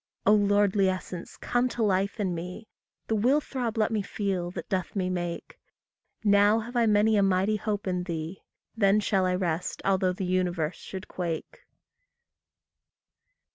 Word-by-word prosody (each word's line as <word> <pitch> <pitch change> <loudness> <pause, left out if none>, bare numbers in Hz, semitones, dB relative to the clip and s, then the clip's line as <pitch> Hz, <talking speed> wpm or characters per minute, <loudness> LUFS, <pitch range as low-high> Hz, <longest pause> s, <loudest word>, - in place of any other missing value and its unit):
O 210 - +6
lordly 205 -1 +3
essence, 185 -2 -5
come 245 +1 0
to 240 - -2
life 200 +1 +1
in 190 -4 0
me; 180 +6 -6 0.4
The - - -1
will 245 +7 +3
throb 245 -6 -4
let 215 0 +2
me 215 -2 +1
feel 195 -3 -2
that 175 -2 -7
doth 185 0 -2
me 185 -2 0
make; 175 -1 -4 0.6
Now 205 +1 +5
have 235 +2 -5
I 235 -1 +3
many 210 +1 +4
a - - +4
mighty 195 +2 +2
hope 210 -1 -3
in 180 -2 -1
thee, 165 +1 -5 0.3
Then 205 -2 +4
shall 195 -3 +1
I 180 - +1
rest 175 -2 -2
although 190 -1 +2
the 185 +1 -4
universe 180 -3 0
should 190 -1 -8
quake. 170 -3 -4
195 Hz, 160 wpm, -27 LUFS, 180-210 Hz, 0.6 s, O